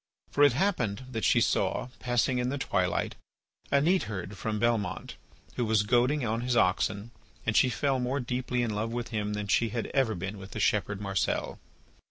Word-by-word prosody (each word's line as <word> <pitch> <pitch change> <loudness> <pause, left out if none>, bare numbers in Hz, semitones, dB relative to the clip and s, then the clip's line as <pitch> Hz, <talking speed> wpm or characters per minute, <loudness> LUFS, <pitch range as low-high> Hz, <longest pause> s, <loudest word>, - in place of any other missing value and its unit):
For 145 - +3
it 145 -4 +6
happened 130 - 0
that 115 -4 -3
she - - +4
saw - - +1
passing 125 0 +1
in 125 0 0
the 140 - -2
twilight 90 -9 0 0.6
a 140 - +4
neatherd 105 - 0
from 105 +3 -3
Belmont, 105 -4 -1 0.4
who 125 - +1
was 110 -1 +3
goading 125 +5 +2
on 115 +1 -1
his 125 0 0
oxen, 100 +3 +1 0.3
and 115 - 0
she 130 - +5
fell 135 +1 0
more 125 +3 -1
deeply 125 -1 -1
in 115 -3 -1
love 110 +2 -2
with 120 0 -3
him 105 -2 -2
than 105 0 -3
she 115 +4 +2
had 115 +1 -2
ever 130 -6 +2
been 95 +3 -5
with 95 0 -10
the 110 - -4
shepherd 100 -1 +1
Marcel. 100 -2 -1
115 Hz, 190 wpm, -29 LUFS, 105-125 Hz, 0.6 s, it